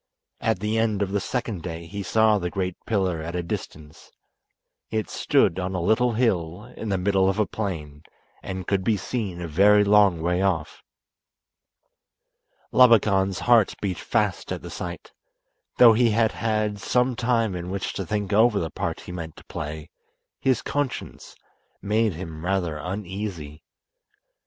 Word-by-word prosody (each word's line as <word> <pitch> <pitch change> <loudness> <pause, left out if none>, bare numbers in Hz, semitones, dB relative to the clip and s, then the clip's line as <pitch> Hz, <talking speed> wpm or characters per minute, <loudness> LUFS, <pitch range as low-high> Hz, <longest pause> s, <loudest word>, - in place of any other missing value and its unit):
At 110 -5 0
the 110 +1 0
end 110 -3 +1
of 95 - -4
the 100 - +1
second 115 -3 -3
day 85 0 -6
he 100 +4 -6
saw 110 +2 +3
the 90 -1 -2
great 90 -1 -3
pillar 95 -7 0
at 85 +2 -5
a 90 - -2
distance. 75 -2 -7 0.8
It 110 -1 -2
stood 85 - +2
on 95 +1 -3
a - - -1
little 115 +7 +2
hill 105 -2 -1
in 110 - -5
the 95 - +1
middle 95 0 +2
of 95 - -1
a 105 - +2
plain, 80 -9 -5 0.4
and 95 -1 -5
could 95 0 0
be 110 +1 +2
seen 100 -3 -4
a 85 - -4
very 100 +6 +5
long 100 -4 +4
way 90 +3 0
off. 90 -6 -1 1.9
Labakan's 100 -6 +4
heart 120 -4 +4
beat 95 -3 -3
fast - - -1
at - - -4
the - - -8
sight. - - -7 0.7
Though 120 -2 +8
he 120 +1 +3
had 110 0 +2
had 110 -2 -1
some 125 +4 +1
time 115 -4 +1
in 90 0 -5
which 95 +1 -3
to 95 - -3
think 100 +2 -2
over 110 +1 +4
the 80 -2 -3
part - - -3
he - - -9
meant 85 -3 -7
to - - -15
play 75 0 -6 0.5
his 130 -3 +1
conscience 145 -2 -4 0.4
made 105 0 +1
him 80 -2 -8
rather 90 -4 -1
uneasy. 90 -4 -5
100 Hz, 160 wpm, -24 LUFS, 90-110 Hz, 1.9 s, Though